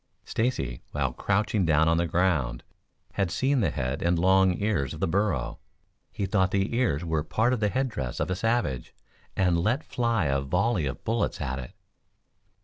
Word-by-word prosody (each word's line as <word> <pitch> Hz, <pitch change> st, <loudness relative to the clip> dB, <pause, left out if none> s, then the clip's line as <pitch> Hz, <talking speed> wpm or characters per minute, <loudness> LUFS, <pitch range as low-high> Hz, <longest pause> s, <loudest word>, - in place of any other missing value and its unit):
Stacy, 110 Hz, -, -1 dB
while 65 Hz, -4 st, 0 dB
crouching 100 Hz, -, 0 dB
down 80 Hz, -1 st, +3 dB
on 80 Hz, 0 st, +3 dB
the 85 Hz, 0 st, +1 dB
ground, 80 Hz, -9 st, 0 dB, 0.5 s
had 100 Hz, -3 st, 0 dB
seen 135 Hz, +9 st, +1 dB
the 95 Hz, -8 st, +2 dB
head 65 Hz, 0 st, -3 dB
and 85 Hz, 0 st, +2 dB
long 95 Hz, +1 st, +4 dB
ears 100 Hz, -, 0 dB
of -, -, -10 dB
the -, -, +1 dB
burro. 90 Hz, -, 0 dB, 0.5 s
He 100 Hz, -, -2 dB
thought 95 Hz, -1 st, +2 dB
the 100 Hz, +4 st, 0 dB
ears 85 Hz, -, +1 dB
were 80 Hz, -2 st, 0 dB
part 110 Hz, +9 st, +1 dB
of 125 Hz, -, -1 dB
the 105 Hz, -1 st, +2 dB
head 130 Hz, +5 st, 0 dB
dress 65 Hz, -, -4 dB
of -, -, -1 dB
a -, -, +1 dB
savage 105 Hz, -, -1 dB, 0.4 s
and 90 Hz, -3 st, +2 dB
let 110 Hz, -, +1 dB
fly 115 Hz, -6 st, 0 dB
a 70 Hz, -1 st, +1 dB
volley 90 Hz, -, +1 dB
of 65 Hz, -, -6 dB
bullets 115 Hz, -1 st, -1 dB
at 65 Hz, -2 st, -3 dB
it. 60 Hz, -, -8 dB
90 Hz, 185 wpm, -27 LUFS, 75-110 Hz, 0.5 s, long